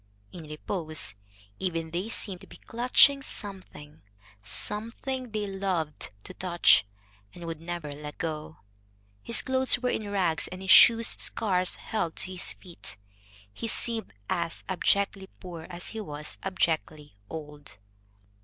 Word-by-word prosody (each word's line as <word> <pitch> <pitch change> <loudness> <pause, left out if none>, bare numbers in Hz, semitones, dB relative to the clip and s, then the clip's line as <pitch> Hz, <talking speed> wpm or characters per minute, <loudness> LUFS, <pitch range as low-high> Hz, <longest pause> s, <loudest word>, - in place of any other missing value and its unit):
In 170 -3 -9
repose, 155 - -1 0.5
even, 165 -3 -2
they 180 +6 -2
seemed 195 -5 -3
to - - -12
be - - -12
clutching 255 +4 +5
something, 185 - -7 0.4
something 230 - -3
they 215 -1 -2
loved 190 -6 -2
to - - -8
touch, 175 - +5 0.5
and 175 - -8
would 165 -1 -5
never 170 -3 -5
let 150 +1 -7
go. 155 -1 -4 0.6
His 235 - +2
clothes 260 0 +4
were 250 0 0
in 210 -2 -2
rags 180 -5 +1
and 185 - -8
his 190 - +2
shoes 230 -1 +9 0.2
scarce 185 -5 +2
held 175 -7 -3
to 185 - 0
his 185 -1 -2
feet. 170 - -8 0.6
He 230 - -4
seemed 225 - 0 0.2
as 170 -1 -2
abjectly 195 +1 +1
poor 170 -3 -8
as 175 +1 -5
he 225 - -5
was 150 -5 -6
abjectly 160 - -1
old. 150 -7 -8
180 Hz, 135 wpm, -28 LUFS, 160-210 Hz, 0.6 s, shoes